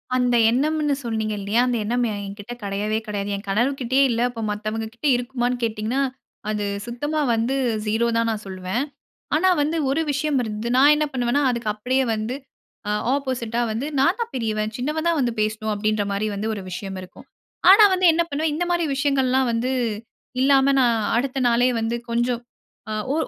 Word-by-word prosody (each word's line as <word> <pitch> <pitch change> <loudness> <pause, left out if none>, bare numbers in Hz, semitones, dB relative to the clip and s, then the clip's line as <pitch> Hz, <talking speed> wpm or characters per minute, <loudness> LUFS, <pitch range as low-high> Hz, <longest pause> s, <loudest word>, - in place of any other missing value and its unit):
அந்த 250 -1 +2
எண்ணம்னு 295 +3 +1
சொன்னீங்க 220 -2 -1
இல்லயா? 205 +4 +1
அந்த 245 -1 0
எண்ணம் 240 +3 0
என்கிட்ட 205 +2 -6
கெடையவே 205 +2 -1
கெடையாது. 205 -1 -3
என் 200 - -7
கணவர்கிட்டயே 260 +4 +2
இல்ல. 235 -1 0
அப்ப 235 -2 -7
மத்தவங்ககிட்ட 220 +4 -4
இருக்குமான்னு 245 0 -1
கேட்டிங்கன்னா? 225 +4 -1 0.5
அது 210 -1 -1 0.2
சுத்தமா 290 +6 -2
வந்து 230 +4 0 0.3
ஜூரோ 220 +3 +1
தான் 230 0 +1
நான் 215 -1 -4
சொல்லுவேன். 190 +6 -2 0.5
ஆனா 375 +4 +3
வந்து 310 +3 0
1 285 +4 +1
விஷயம் 285 0 0
இருந்தது. 215 0 -4
நான் 280 +3 +7
என்ன 300 0 +1
பண்ணுவேன்னா, 250 +2 +1
அதுக்கு 235 -3 -2
அப்பிடியே 255 +5 0
வந்து 220 +4 -3 0.5
ஆ - - 0 0.2
ஆப்போசிட்டா 255 -4 -1
வந்து. 230 +6 -2
நான் 340 - +3
தான் 465 - -3
பெரியவன், 215 -3 -1
சின்னவ 300 +6 -2
தான் 335 -2 +2
வந்து 245 -2 +1
பேசணும் 215 0 -1
அப்பிடின்ற 215 0 0
மாரி 200 +2 -1
வந்து 210 +2 -3
1 205 - -6
விஷயம் 190 +1 -5
இருக்கும். 185 - -13 0.4
ஆனா 415 +3 +9
வந்து 370 0 +3
என்ன 340 - +2
பண்ணுவேன். 305 +1 -1
இந்த 340 +3 -1
மாரி 345 -1 +1
விஷயங்கள்லாம் 265 -2 +2
வந்து 235 +3 0 0.7
இல்லாம 275 0 +4
நான் 240 -2 +3 0.2
அடுத்த 270 +2 -1
நாளே 240 +2 +3
வந்து 225 +1 -1
கொஞ்சம். 240 +1 0 0.5
ஆ - - -2 0.2
ஓ - - 0
240 Hz, 170 wpm, -23 LUFS, 215-275 Hz, 0.7 s, ஆனா